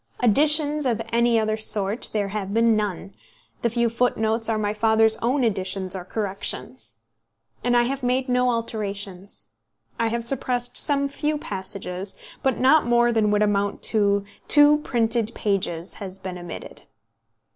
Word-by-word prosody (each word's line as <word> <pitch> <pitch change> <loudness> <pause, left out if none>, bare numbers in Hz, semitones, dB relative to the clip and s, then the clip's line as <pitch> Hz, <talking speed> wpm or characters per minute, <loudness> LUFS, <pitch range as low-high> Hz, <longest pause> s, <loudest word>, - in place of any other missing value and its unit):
Additions 295 +4 +2
of 230 -3 0
any 235 0 +3
other 215 0 0
sort 215 0 +2
there 205 -2 -1
have 200 0 -4
been 230 -1 +4
none; 200 -2 -3 0.5
the 235 - +1
few 235 +1 +1
footnotes 225 -1 +1
are 220 - +1
my 210 -1 -1
father's 220 +1 +3
own 255 +3 0
additions 190 -3 +1
or 185 - -5
corrections. 200 0 -4 0.6
And 245 0 +2
I 240 - +4
have 270 +3 -3
made 255 +1 0
no 250 0 +2
alterations. 200 - -5 0.5
I 230 - +1
have 235 +1 -2
suppressed 245 0 0
some 280 -1 +2
few 300 +2 -2
passages, 190 -4 -5 0.3
but 265 -3 0
not 275 +2 +4
more 240 0 +3
than 220 -2 +2
would 210 0 +2
amount 205 -1 -1
to 200 -2 +2 0.2
two 295 0 +6
printed 235 -4 0
pages 190 -4 -2
has 190 -2 -7
been 185 -2 -7
omitted. 175 0 -9
225 Hz, 150 wpm, -23 LUFS, 200-245 Hz, 0.6 s, two